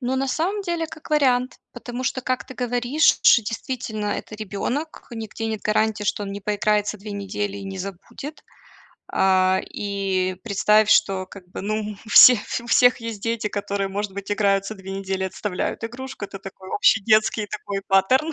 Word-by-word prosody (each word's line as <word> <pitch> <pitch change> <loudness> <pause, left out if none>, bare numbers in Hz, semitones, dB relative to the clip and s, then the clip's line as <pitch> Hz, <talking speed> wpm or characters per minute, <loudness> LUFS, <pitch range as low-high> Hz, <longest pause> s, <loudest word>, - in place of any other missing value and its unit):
Ну, 255 +1 -1
на 270 0 0
самом 370 +9 -1
деле, 340 -3 -2
как 310 0 -12
вариант, 255 -4 +2
потому 245 +1 -6
что, 260 - -1
как 255 0 -2
ты 260 - -9
говоришь, 245 +5 +2
ш 235 - +7
действительно 220 -1 -4
это 215 - -4
ребёнок, 220 - -4
нигде 225 -1 -5
нет 220 -2 -3
гарантии, 215 0 +1
что 205 0 -1
он 195 - -5
не 200 - -6
поиграется 210 +1 0
2 210 +1 -8
недели 200 0 -3
и 200 - -7
не 195 -1 -6
забудет. 195 - -8 0.7
А, 190 0 +3 0.2
и 195 -2 -1
представь, 210 0 +3
что 190 -1 +3
как 195 0 -12
бы, - - -7
ну, 215 0 -3
у - - -11
всех 250 0 +10 0.2
у - - -12
всех 245 +1 +5
есть 230 -3 -5
дети, 230 -2 -1
которые 200 -1 -2
может 200 0 -3
быть 200 0 -7
играются 200 0 +1
2 190 0 -9
недели 195 -1 -3
и - - +1
отставляют 190 +2 -3
игрушку. 255 -1 -6
Это 195 - -9
такой 190 -1 -11
общий 220 - +4
детский 215 0 +3
такой 200 -1 -5
паттерн. 255 +11 +3
210 Hz, 180 wpm, -23 LUFS, 195-245 Hz, 0.7 s, всех